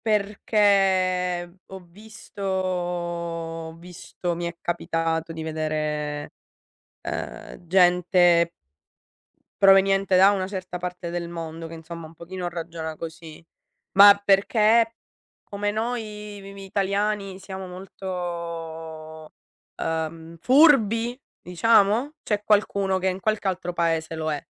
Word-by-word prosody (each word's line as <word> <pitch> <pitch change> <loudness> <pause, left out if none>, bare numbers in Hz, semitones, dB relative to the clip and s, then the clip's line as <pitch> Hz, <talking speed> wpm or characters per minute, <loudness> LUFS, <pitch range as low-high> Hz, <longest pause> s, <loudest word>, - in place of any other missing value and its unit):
Perché 195 -4 +1
ho 190 - -9
visto 210 +3 -13
ho 175 -3 -3
visto 175 0 -6
mi 170 +1 -4
è 170 0 -5
capitato 165 -1 -2
di 160 -1 -6
vedere, 155 -2 -3 0.7
uhm, 175 - -6
gente 175 -1 +4 1.1
proveniente 195 0 +5
da 190 +2 +7
una 190 -2 -1
certa 185 -2 -6
parte 180 -1 -5
del 170 -1 -4
mondo 165 -1 -6
che 165 - -9
insomma 165 0 -9
un 160 - -17
pochino 175 +2 -6
ragiona 165 -2 -6
così. 165 0 -9 0.5
Ma 200 +1 +8
perché 220 +3 +4 0.5
come 205 0 -3
noi 210 -2 -4
mi 195 0 -10
mi 195 0 -10
italiani 200 0 -1
siamo 190 -1 -8
molto, 170 -4 -7 0.4
uhm, 160 +1 -4
furbi, 245 -5 +4 0.2
diciamo? 220 - +3
C'è 210 -1 -1
qualcuno 200 -2 +2
che 190 0 0
in 185 0 -4
qualche 215 0 -1
altro 185 -1 -2
paese 165 -1 -1
lo 160 -1 -2
è. 145 - -3
180 Hz, 110 wpm, -24 LUFS, 165-200 Hz, 1.1 s, Ma